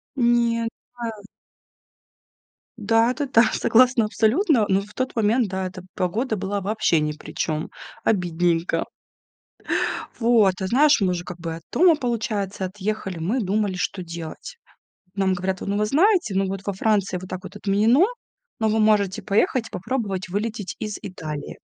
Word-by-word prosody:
Нет, 235 -2 +2 0.3
да. 235 -1 -4 1.7
Да, 225 +2 +3
это 285 +2 -3
да, 230 -3 +5
согласна 245 -1 +4
абсолютно, 230 - +2
но 195 +1 +3
в 210 +1 -12
тот 255 -1 -3
момент, 225 +2 +2
да, 190 0 -3
эта 185 0 -7
погода 220 +7 -1
была 200 +1 -2
вообще 205 -4 +1
ни 150 0 0
при 150 - -10
чём, 155 -1 -2 0.3
обидненько. 175 -3 +1 1.3
Вот, 225 -5 +4
а 190 - -1
знаешь, 285 +7 +5
мы 185 - +3
уже 175 -1 -3
как 180 -1 -8
бы 165 -1 -4
от 165 - -11
дома, 340 -1 +5
получается, 215 -7 -2
отъехали, 195 -1 -4
мы 195 +11 0
думали, 205 -2 0
что 185 +1 -3
делать. 170 - -8 0.6
Нам 195 -2 +1
говорят: 185 +1 -2
"Вот, - - -5
ну, 200 - 0
вы 210 - +2
знаете, 335 - +3
ну, 195 0 +1
вот 195 0 -4
во 200 - 0
Франции 195 -2 0
вот 185 - -9
так 185 -1 -5
вот 195 +2 -9
отменено, 215 - +3 0.5
но 220 - +2
вы 220 +1 +1
можете 215 -1 +2
поехать 215 +4 +1
и - - -32
попробовать 195 -3 -3
вылететь 205 +1 -3
из 210 -1 -4
Италии". 155 -7 -6
205 Hz, 160 wpm, -23 LUFS, 185-230 Hz, 1.7 s, да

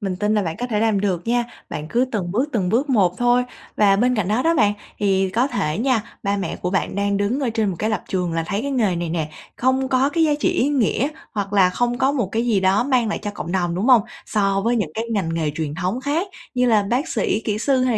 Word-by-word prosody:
Mình 195 -3 -3
tin 210 +3 0
là 210 - +2
bạn 165 -3 -3
có 245 - -2
thể 215 -4 -1
làm 220 -3 +2
được 190 -3 -1
nha. 240 +1 +2 0.3
Bạn 150 - -5
cứ 240 +8 +2
từng 185 -6 -2
bước, 250 +8 0
từng 195 -6 0
bước 260 +9 +1
một 190 -7 +2
thôi. 245 +1 +3 0.3
Và 200 -2 +4
bên 250 +4 +2
cạnh 200 -4 0
đó 220 +5 +1
đó 330 +3 +3
bạn, 205 -8 +3 0.2
thì 195 -2 +1
có 235 +6 +2
thể 185 - -2
nha, 245 -2 +1 0.2
ba 200 -2 0
mẹ 195 - -3
của 180 - -3
bạn 190 - -1
đang 200 0 0
đứng 205 +7 0
ở 260 -4 0
trên 220 -2 0
một 180 - -5
cái 215 - 0
lập 215 - -1
trường 180 -3 -1
là 165 - 0
thấy 200 +5 -2
cái 280 - -2
nghề 220 -9 +1
này 170 0 -2
nè 160 -2 -2 0.3
không 260 +1 +1
có 260 +1 +3
cái 330 +1 +2
giá 305 - +3
trị - - +2
ý 265 - +1
nghĩa, 270 -2 +1 0.2
hoặc 200 -1 -3
là 190 -3 +5
không 245 +5 -1
có 270 +1 +2
một 250 -9 -1
cái 230 +2 0
gì 215 -5 +2
đó 190 +4 +3
mang 250 -4 +2
lại - - -2
cho 205 - -3
cộng 175 -4 -6
đồng, 175 -2 0
đúng 190 +6 -1
hông? 250 -5 +6 0.2
So 195 -2 +1
với 240 +1 +2
những 200 -9 -1
cái 225 - -2
ngành 180 -6 -1
nghề 160 -2 0
truyền 155 -2 -3
thống 185 +8 -2
khác 300 +8 -1 0.3
như 250 0 +2
là 220 -3 +4
bác 255 +6 0
sĩ, 210 - 0
kĩ 210 -2 -1
sư 265 +3 +2
hay 255 - +2
210 Hz, 275 wpm, -21 LUFS, 190-250 Hz, 0.3 s, hông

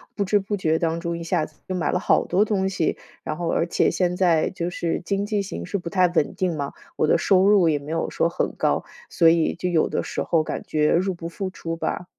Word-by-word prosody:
不 205 - 0
知 205 +2 +2
不 205 +1 -3
觉 160 -4 +1
当 165 -1 0
中 170 0 -3
一 - - -7
下 165 -2 0
子 155 - -18
又 185 - -3
买 175 - 0
了 180 - +1
好 - - +3
多 195 +4 +2
东 195 -3 0
西， 170 -4 -1 0.2
然 155 - -4
后 170 0 -3
而 170 - +1
且 - - +2
现 180 -1 0
在 170 -4 +3
就 175 -2 -3
是 170 -2 -2
经 200 +2 -1
济 205 -1 0
形 195 - -6
势 200 - -2
不 175 -2 -6
太 185 -1 +3
稳 170 -4 0
定 180 -3 -1
嘛， 140 -1 -3 0.2
我 - - +1
的 - - +4
收 190 -1 +3
入 200 -4 +5
也 150 -2 +2
没 145 +2 -8
有 165 - -1
说 170 - +1
很 - - -2
高， - - 0 0.2
所 165 - +3
以 165 -1 +4
就 180 +1 -3
有 170 -3 +2
的 - - -1
时 - - -3
候 165 -2 +2
感 - - -4
觉 150 -1 +1
入 185 +2 +2
不 165 -1 -7
敷 185 +3 -4
出 165 -3 -5
吧。 175 +1 -3
175 Hz, 280 characters per minute, -23 LUFS, 165-190 Hz, 0.2 s, 入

